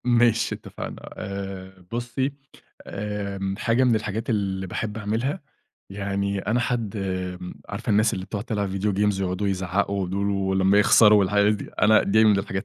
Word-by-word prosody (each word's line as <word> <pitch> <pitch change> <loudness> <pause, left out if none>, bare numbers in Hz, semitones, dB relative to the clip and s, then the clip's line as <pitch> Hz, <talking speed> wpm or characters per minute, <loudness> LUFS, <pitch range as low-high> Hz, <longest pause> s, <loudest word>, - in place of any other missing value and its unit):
ماشي 120 -2 +3
اتفقنا - - -8
آآ، 95 -1 -7
بُصي 120 +3 -2 0.5
آآ 100 -1 -4
حاجة 120 +3 +2
من 125 -2 +4
الحاجات 110 +2 -3
اللي 95 -3 -1
باحب 105 +3 -4
أعملها 115 - -2 0.5
يعني 100 0 -2
أنا 110 +5 0
حد 115 -3 -2
امم، 90 -2 -4
عارفة 105 +3 -4
الناس 105 +1 +3
اللي 95 - -5
بتقعد 105 +1 -5
تلعب 105 -4 -2
فيديو 100 +2 -1
games 100 0 +1
ويقعدوا 95 +2 -1
يزعقوا 95 0 -1
دول 100 +2 -1
ولما 95 0 +2
يخسروا 105 0 +6
الحاجات 105 +2 +3
دي، 100 - -7
أنا 110 +2 +6
دي 110 +3 +4
من 105 -2 +5
الحاجات 95 -1 -3
100 Hz, 155 wpm, -24 LUFS, 95-110 Hz, 0.5 s, يخسروا